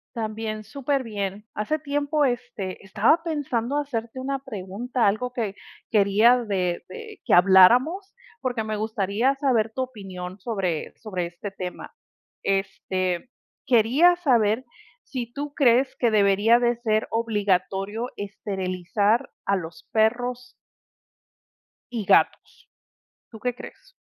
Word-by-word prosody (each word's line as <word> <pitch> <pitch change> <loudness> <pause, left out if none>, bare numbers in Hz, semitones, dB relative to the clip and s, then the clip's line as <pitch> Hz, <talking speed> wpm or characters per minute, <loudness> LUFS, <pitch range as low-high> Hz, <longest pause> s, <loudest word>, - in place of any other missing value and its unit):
También 215 -1 -4
súper 275 +4 -1
bien. 205 -1 -4
Hace 215 +9 -1
tiempo, 290 +1 0
este, 240 -8 -3
estaba 220 - +3
pensando 285 -5 -2
hacerte 245 -4 -4
una 275 +1 -2
pregunta, 230 0 -3
algo 220 +5 0
que 220 -6 -3 0.4
quería 215 +3 +5
de 180 -4 -1
de 450 -3 -10
que - - +3
habláramos, 240 - +5 0.3
porque 245 -3 -2
me 215 0 -3
gustaría 215 +4 0
saber 245 -6 +1
tu 260 - -1
opinión 195 -6 -7
sobre 185 -8 -2
sobre 185 -6 -3
este 175 +4 -7
tema. 185 -2 -7 0.5
Este, 195 +1 -1 0.4
quería 260 +10 +5
saber 240 -8 +2 0.4
si 240 -3 -5
tú 290 +3 -5
crees 255 -1 +3
que 240 - +2
debería 205 +2 +4
de 240 0 +1
ser 220 -2 0
obligatorio 205 0 0
esterilizar 200 +1 -1 0.2
a 200 - +2
los 175 +7 -7
perros 245 +3 0 1.4
y 225 -4 -3
gatos. - - +2 0.7
¿Tú 220 - -11
qué 250 +2 -1
crees? - - -12
225 Hz, 120 wpm, -24 LUFS, 200-250 Hz, 1.4 s, quería